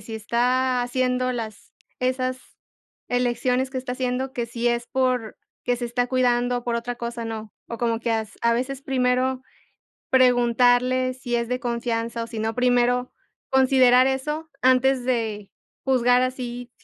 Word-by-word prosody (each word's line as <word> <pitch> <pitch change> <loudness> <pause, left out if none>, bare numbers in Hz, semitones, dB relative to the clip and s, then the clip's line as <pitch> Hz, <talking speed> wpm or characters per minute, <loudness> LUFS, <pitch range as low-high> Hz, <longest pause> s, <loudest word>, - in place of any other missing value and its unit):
si 225 +2 -8
está 250 +3 +1
haciendo 255 +1 0
las 220 -4 -7 0.3
esas 255 0 -1 0.7
elecciones 250 +1 0
que 260 - -7
está 255 -1 -3
haciendo, 255 +1 -2
que 240 -4 -3
si 235 +1 -1
es 235 0 -1
porque 250 -1 -2
se 240 - -4
está 245 +1 -1
cuidando 245 -1 +1
o 240 - -10
por 235 -1 0
otra 240 +1 -3
cosa 235 -1 -5
no, 220 -2 -6 0.2
o 235 - -5
como 230 -1 -1
que 235 - -2
as 220 -1 -2
a 235 0 +3
veces 260 +3 -3
primero 255 -1 0 0.7
preguntarle, 250 0 +3
si 255 -1 -3
es 235 0 -1
de 250 +1 -2
confianza, 235 -1 -2
o - - -7
si 230 -1 -6
no, 220 +1 -1
primero 245 0 +2 0.4
considerar 260 -1 +5
eso 300 +4 -2
antes 255 0 +3
de 220 -5 -2 0.3
juzgar 250 -2 +3
así, 245 -1 -4
245 Hz, 155 wpm, -24 LUFS, 235-255 Hz, 0.7 s, considerar